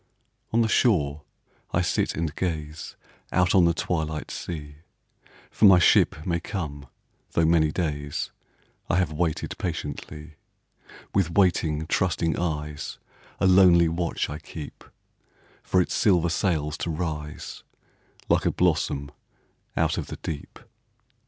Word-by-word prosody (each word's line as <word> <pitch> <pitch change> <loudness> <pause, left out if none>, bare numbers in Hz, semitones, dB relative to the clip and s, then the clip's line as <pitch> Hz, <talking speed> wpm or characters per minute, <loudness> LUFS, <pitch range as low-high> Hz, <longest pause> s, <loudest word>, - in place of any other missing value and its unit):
On 115 - +3
the 115 - +3
shore 75 - +2 0.5
I 85 - +3
sit 90 - 0
and 80 -2 -2
gaze 80 -3 -4 0.4
Out 90 -1 +3
on 90 -3 +6
the 85 - +3
twilight 80 -3 -2
sea, 75 -4 -6 0.7
For - - +3
my 95 -3 +9
ship 80 -3 +4
may 85 -2 0
come, 75 -6 -5 0.5
though 85 - +3
many 80 -2 +3
days 75 -4 -3 0.6
I - - +2
have 90 -4 +1
waited 80 0 -2
patiently; 75 -2 -5 0.8
With 95 -4 +2
waiting 80 -5 +2
trusting 85 -2 0
eyes, 75 -4 -3 0.4
A - - +2
lonely 90 -3 +6
watch 85 +1 -1
I 75 +1 -6
keep 80 -3 -9 0.8
For 90 - +1
its 90 - +1
silver 90 -5 +3
sails 80 -4 0
to - - -2
rise 75 -2 -4 0.7
Like - - +2
a - - +3
blossom 70 0 0 0.7
out - - +1
of - - -5
the - - -7
deep. 75 -3 -6
80 Hz, 130 wpm, -25 LUFS, 75-90 Hz, 0.8 s, my